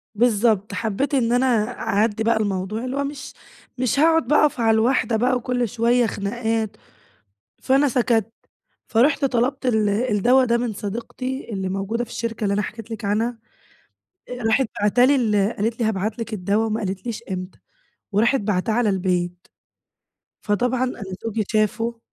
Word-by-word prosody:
بالضبط، 220 -2 +2
حبّيت 230 +5 -2
إن 240 -4 +2
أنا 245 +2 +3 0.3
أعدّي 210 +2 0
بقى 230 0 +2
الموضوع، 205 +2 -2
اللي 255 +2 -3
هو 280 - 0
مش 280 0 -6 0.4
مش 255 +2 0
هاقعد 325 +1 +4
بقي 300 - +4
أقف 295 -4 +2
على 225 -1 +3
الواحدة 235 0 +2
بقى، 250 +3 +2
وكل 245 -1 -1
شوية 240 +2 +2
خناقات، 220 +1 -2 0.8
فانا 275 +2 +3
سَكَتْ. 230 -3 +1 0.6
فرُحت 275 +5 +3
طَلَبت 260 +1 0
ال 220 -4 +2
الدّوا 240 +4 +3
ده 235 -1 +2
من 235 -2 -2
صديقتي 240 +6 -5
اللي 190 -1 -2
موجودة 195 +5 -2
في 240 - -10
الشركة 230 -2 -4
اللي 200 - +1
أنا 205 - +1
حكيت 225 +1 -7
لِك 225 -1 -5
عنها. 225 +4 -1 0.9
آآ 245 -2 -6
راحت 225 +3 +2
باعته 210 +5 +4
لي 280 +2 +4
ال 210 -3 +1
قالت 225 +3 -1
لي 230 - +1
هابعت 215 +1 -1
لِك 230 -1 -5
الدّوا، 205 +3 0
وما 220 0 -1
قالتليش 200 +4 -4
إمتى. 185 0 -6 0.5
وراحت 235 +7 +3
باعتاه 205 +1 0
على 235 -1 +2
البيت. 180 -2 -1 0.9
فطبعًا 245 +4 0
أنا 250 -4 -3 0.2
زوجي 225 -1 -2
شافه، 225 +2 0
225 Hz, 160 wpm, -22 LUFS, 210-245 Hz, 0.9 s, هاقعد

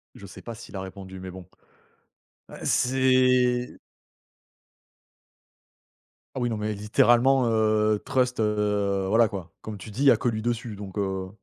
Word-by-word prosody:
Je 100 - -11
sais - - -12
pas 115 -1 -8
s'il 110 -2 -12
a - - -4
répondu 95 0 -9
mais 95 0 -7
bon, 95 -1 -10 1.1
heu, - - -11
c'est 125 -1 +2 2.6
Ah - - -2
oui 120 - 0
non 110 - -2
mais 105 0 -2
littéralement, 120 +5 +3
heu, 110 -1 +2
Trust, 125 -3 0
heu, 105 -2 0
voilà 110 +2 +4
quoi. 95 -5 -8
Comme 110 -2 -7
tu 100 - -10
dis 110 +6 -6
il - - +2
y 135 - +9
a - - +4
que - - -2
lui 110 -2 -1
dessus 115 -1 -3
donc, 100 0 -9
heu 95 -2 -2
110 Hz, 165 wpm, -25 LUFS, 100-120 Hz, 2.6 s, y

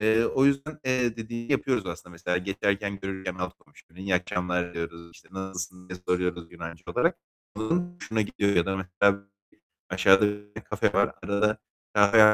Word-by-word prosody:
Eee, 110 +2 +4
o 130 +3 +3
yüzden, 140 +2 +2
eee, 125 -3 +2
dediğini 115 +3 -4
yapıyoruz 130 -6 +1
aslında. 85 0 -6
Mesela 90 +1 -1
geçerken 100 +1 -1
görürsem 95 -1 -4
alt 90 0 -2
komşumu, 85 +3 -21
"İyi 95 -1 0
akşamlar." 90 0 0
diyoruz, 85 0 -5
işte, - - -18
"Nasılsın?" 90 -1 -6
diye 90 0 -6
soruyoruz 90 -2 0
Yunanca 85 -1 -8
olarak. - - +1 0.4
Onun 175 +11 0
hoşuna 110 -10 -2
gidiyor. 100 -1 0
Ya 85 - +4
da 95 0 0
mesela 100 +2 +2 0.7
aşağıda 95 +2 +6
bir 105 0 -6
tane - - -8
kafe - - 0
var. - - +3
Arada 105 +1 +2 0.4
kahve 105 +1 +8
95 Hz, 165 wpm, -27 LUFS, 90-110 Hz, 0.7 s, kahve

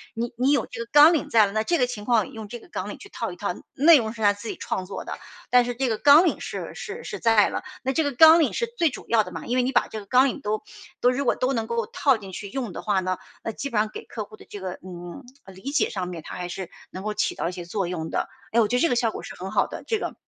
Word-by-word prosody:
你 235 +1 -3
你 255 +3 +1
有 290 - +2
这 - - -9
个 230 - -15
纲 295 +3 +8
领 315 - -1
在 220 -2 +6
了， 200 - -4
那 215 +1 0
这 340 +8 +1
个 250 - +3
情 210 -4 -6
况 235 0 +2
用 220 -3 -8
这 240 - -7
个 - - -17
纲 - - -4
领 - - -7
去 400 - -13
套 - - -4
一 - - -9
套， - - -3 0.2
内 310 +4 +7
容 220 -4 -2
是 230 - -10
他 205 -1 +5
自 205 +3 -9
己 - - -4
创 185 - -3
作 195 - -6
的， - - -5 0.3
但 245 -1 +5
是 245 - -2
这 260 +1 0
个 220 - 0
纲 290 +7 +7
领 340 - +1
是 - - -5
是 475 0 -7
是 405 - -6
在 225 -3 +5
了。 - - -4 0.2
那 265 - 0
这 320 - +2
个 285 - 0
纲 320 +5 +8
领 315 - +2
是 470 - 0
最 335 -6 +3
主 250 - -9
要 225 -2 +4
的 180 - -9
嘛， - - -7
因 245 - -1
为 - - +4
你 255 - 0
把 - - +2
这 220 - -6
个 205 - -11
纲 250 +6 +5
领 275 - -4
都 215 -3 -2 0.4
都 245 - +5
如 275 +2 -2
果 - - +3
都 255 +1 0
能 225 -3 -2
够 235 -1 -1
套 270 -4 +2
进 195 -3 -10
去 200 +2 -7
用 245 -2 -4
的 - - -6
话 205 -3 +1
呢， 185 0 -1 0.3
那 225 - -2
基 280 +6 -5
本 230 - -2
上 215 0 +1
给 - - -7
客 220 - -5
户 215 +1 -15
的 - - -15
这 205 - -7
个 185 -1 -4
嗯， 175 +5 -8 0.2
呃 195 - -12
理 195 +10 -6
解 290 - +2
上 185 -3 -3
面， 170 -3 -7
它 - - -7
还 180 -1 -4
是 185 0 -6 0.2
能 185 - -7
够 215 0 -2
起 210 - 0
到 - - -2
一 - - -5
些 175 -1 -7
作 190 +1 -2
用 160 -2 -4
的。 - - -1 0.3
诶， 235 - +4
我 220 - +4
觉 245 - 0
得 250 - +2
这 335 - +4
个 245 - +1
效 235 -2 +2
果 - - -7
是 - - -8
很 185 +2 -6
好 - - +2
的， - - -8
这 450 - +1
个。 - - -4
230 Hz, 350 characters per minute, -25 LUFS, 200-270 Hz, 0.4 s, 纲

